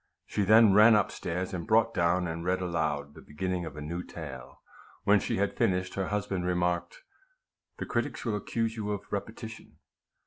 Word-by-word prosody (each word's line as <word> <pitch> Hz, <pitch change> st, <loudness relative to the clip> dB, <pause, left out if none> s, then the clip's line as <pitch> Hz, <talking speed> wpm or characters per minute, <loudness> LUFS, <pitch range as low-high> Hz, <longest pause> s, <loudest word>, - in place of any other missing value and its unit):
She -, -, -2 dB
then 110 Hz, +1 st, +7 dB
ran 110 Hz, +2 st, +8 dB
up 105 Hz, -3 st, +2 dB
stairs, 90 Hz, +3 st, -4 dB
and 90 Hz, +2 st, -4 dB
brought 115 Hz, +1 st, +3 dB
down, 90 Hz, +1 st, +2 dB
and 85 Hz, 0 st, -4 dB
read 90 Hz, +1 st, +1 dB
aloud, 75 Hz, -5 st, -2 dB
the -, -, -13 dB
beginning 90 Hz, +3 st, -3 dB
of 75 Hz, -2 st, -8 dB
a -, -, -5 dB
new 85 Hz, +4 st, -4 dB
tale. 70 Hz, -8 st, -9 dB, 0.4 s
When 100 Hz, 0 st, +5 dB
she 115 Hz, -, -2 dB
had 100 Hz, +1 st, 0 dB
finished, 95 Hz, 0 st, 0 dB
her 95 Hz, -2 st, -2 dB
husband 100 Hz, -3 st, -2 dB
remarked, 90 Hz, -, -1 dB, 0.4 s
" -, -, -56 dB
The -, -, -4 dB
critics -, -, -2 dB
will 110 Hz, -3 st, 0 dB
accuse 115 Hz, +2 st, -2 dB
you 105 Hz, -2 st, -4 dB
of 100 Hz, -, -4 dB
repetition." 110 Hz, +2 st, -6 dB
95 Hz, 185 wpm, -29 LUFS, 85-105 Hz, 0.4 s, ran